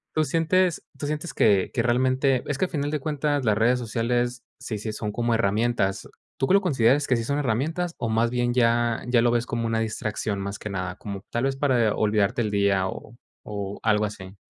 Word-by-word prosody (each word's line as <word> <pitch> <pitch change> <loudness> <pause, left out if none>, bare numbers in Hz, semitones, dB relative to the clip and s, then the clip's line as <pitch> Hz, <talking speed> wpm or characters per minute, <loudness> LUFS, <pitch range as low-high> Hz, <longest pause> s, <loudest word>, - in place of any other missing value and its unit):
Tú 155 - +3
sientes 165 +4 +1
tú - - -5
sientes 150 +3 -3
que 100 -2 +3
que 115 - +1
realmente 130 +2 +2
es 145 - -2
que 185 - +1
al - - -8
final 145 -3 -1
de 150 - -1
cuentas, 145 -1 -1
las 105 -2 +2
redes 120 +3 +3
sociales 120 +1 -1 0.2
sí, 110 - -4
sí 110 +1 -4
son 105 0 -4
como 120 +2 0
herramientas, 105 -1 0 0.3
¿tú 135 - 0
que - - +3
lo 200 - +5
consideras 140 - +3
que 125 - +3
sí 115 - -1
son 140 +5 -1
herramientas? 150 +7 -1
o 115 - -2
más 115 +1 +1
bien 120 0 0
ya 120 -1 +2
ya 125 -1 +3
lo 120 - +3
ves 120 0 +1
como 115 -1 -2
una 115 0 0
distracción 110 -2 -2
más 100 +1 -4
que 105 - -6
nada, 90 -2 -4
como 100 -2 -7
tal 120 - -1
vez 135 0 0
para 125 -6 +2
olvidarte 105 +1 +1
del 105 -2 -1
día 100 -2 +2
o 110 +4 -8 0.3
o 100 -1 -5
algo 105 -1 +3
así. 95 -2 -8
120 Hz, 220 wpm, -25 LUFS, 105-135 Hz, 0.3 s, lo